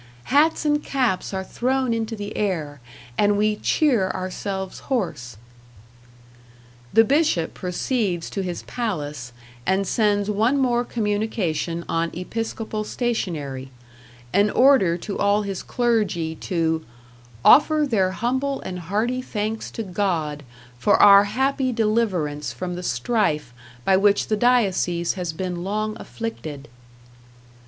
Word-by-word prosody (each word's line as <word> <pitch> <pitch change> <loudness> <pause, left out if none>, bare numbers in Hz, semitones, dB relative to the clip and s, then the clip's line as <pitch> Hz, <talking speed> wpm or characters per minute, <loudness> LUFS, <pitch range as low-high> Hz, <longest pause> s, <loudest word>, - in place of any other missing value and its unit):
Hats 310 +2 +4
and 295 0 +2
caps 250 -9 0
are 190 -1 -3
thrown 255 +4 0
into 225 0 -2
the 205 0 -6
air, 155 -9 -2 0.4
and 205 0 +3
we 210 +1 +2
cheer 235 -5 +2
ourselves 190 +1 -4
hoarse." 125 - -2 1.5
The 225 - +6
Bishop 275 - +1
proceeds 180 -1 -2
to 195 - -2
his 180 -2 -4
palace, 150 - -4 0.3
and 190 +6 +1
sends 205 0 +1
one 220 +6 +2
more 245 -3 +2
communication 205 -8 -2
on 165 0 0
episcopal 220 +3 -4
stationery 160 - -3 0.6
an 205 +2 +4
order 245 -10 +4
to 200 +3 -5
all 205 +1 +2
his 195 -2 -4
clergy 210 -9 0
to 160 -1 -1 0.6
"offer 305 0 +6
their 195 -7 +2
humble 260 +8 -1
and 180 -1 -5
hearty 215 +9 -1
thanks 220 -2 -3
to 225 - -5
God 175 -7 -1 0.4
for 120 - +4
our 200 0 +8
happy 265 +4 0
deliverance 195 - 0
from 180 +10 -5
the 175 - -5
strife 150 - 0 0.3
by 190 - +4
which 200 +1 +3
the 215 - +2
diocese 195 -7 +2
has 180 -3 -3
been 175 +1 -4
long 215 +2 -2
afflicted." 155 - -6
205 Hz, 125 wpm, -23 LUFS, 175-230 Hz, 1.5 s, our